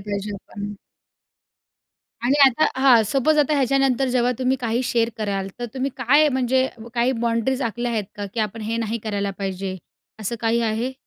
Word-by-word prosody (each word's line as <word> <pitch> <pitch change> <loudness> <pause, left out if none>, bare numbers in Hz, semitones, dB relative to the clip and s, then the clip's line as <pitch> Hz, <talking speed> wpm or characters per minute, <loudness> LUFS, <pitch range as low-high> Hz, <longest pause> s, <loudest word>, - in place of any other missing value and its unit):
पाहिजे 200 +1 -3
आपण. 205 +1 -7 1.5
आणि 260 +4 +3
आता 265 +4 +3
हां. 255 -4 +6
सपोज 280 +6 +2
आता 295 +1 +3
ह्याच्यानंतर 270 -1 +2
जेव्हा 245 0 +2
तुम्ही 260 +1 +1
काही 235 +1 0
शेअर 230 -1 +1
कराल, 195 -2 -2
तर 240 - -3
तुम्ही 265 +1 -1
काय 285 +4 +4
म्हणजे 260 -1 +1
अ, 230 -3 -11
काही 245 +2 +2
बाउंडरीज 235 +3 0
आखल्या 240 +1 -2
आहेत 215 -3 -1
का, 205 0 -4
की 225 - 0
आपण 215 +1 -3
हे 225 +2 -2
नाही 230 0 -2
करायला 200 -2 -1
पाहिजे, 190 -1 -3 0.4
असं 215 +3 -3
काही 230 +1 +1
आहे? 225 +3 -1
235 Hz, 175 wpm, -22 LUFS, 215-260 Hz, 1.5 s, हां